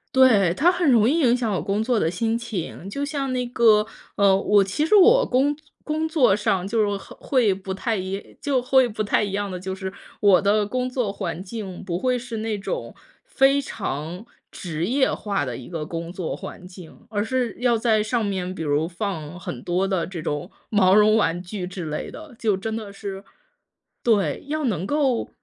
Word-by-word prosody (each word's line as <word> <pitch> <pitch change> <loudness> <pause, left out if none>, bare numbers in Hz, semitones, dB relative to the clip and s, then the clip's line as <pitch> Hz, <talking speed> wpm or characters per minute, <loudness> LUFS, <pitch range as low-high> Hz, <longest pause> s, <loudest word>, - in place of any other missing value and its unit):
对， 220 -9 +6
它 340 - +4
很 350 -5 +1
容 230 -3 +5
易 325 - +2
影 250 -5 +4
响 230 -4 -1
我 180 - -1
工 200 +6 -1
作 240 -1 +1
的 160 - +1
心 225 +6 -1
情， 195 -4 -5
就 280 +7 -3
像 280 -3 -2
那 250 -1 -1
个 225 -3 +4 0.3
呃， 200 -2 +5
我 200 +1 +4
其 195 +10 -1
实 420 - +4
我 460 +6 +7
工 275 +4 +2 0.3
工 315 +1 -1
作 255 -11 +4
上 195 -3 0
就 225 +1 +1
是 205 -1 +1
和 - - -12
会 240 -8 +2
不 190 0 -7
太 220 +3 -1
一 190 +1 -5
就 275 -3 +1
会 255 0 +3
不 215 0 -3
太 210 - +2
一 200 - -3
样 200 -1 -2
的 180 - -5
就 190 +1 -4
是， 190 0 -6 0.3
我 195 -4 +5
的 205 +1 +2
工 255 +3 -2
作 245 -6 -2
环 185 -2 -4
境 195 -3 -7
不 175 -1 -2
会 250 +1 +1
是 240 -2 -6
那 215 -1 -2
种 - - -5 0.3
非 275 - +3
常 175 - -5 0.2
职 165 -2 -4
业 265 +2 +2
化 200 -8 -2
的 125 - -4
一 125 - -9
个 165 -3 -4
工 165 +1 -5
作 180 -2 -4
环 180 - -9
境， 180 -3 -13
而 205 -1 -1
是 250 0 -1
要 245 -2 +3
在 220 -2 +2
上 225 +1 0
面 185 -2 -2
比 160 - -4
如 150 +2 +1
放 175 -3 -5
很 130 -8 -6
多 180 +2 0
的 185 -4 -1
这 175 -5 -6
种 150 +6 -3 0.2
毛 195 -2 +4
绒 215 +1 +6
玩 175 -5 +2
具 180 +1 -5
之 180 -2 -6
类 150 0 -4
的。 305 -6 -11
就 210 -4 +1
真 220 +3 -4
的 215 -3 -6
是 195 -1 -7 0.8
对， 215 -5 +1
要 310 +1 -2
能 190 -6 -1
够 275 -5 +1
205 Hz, 220 characters per minute, -23 LUFS, 185-245 Hz, 0.8 s, 我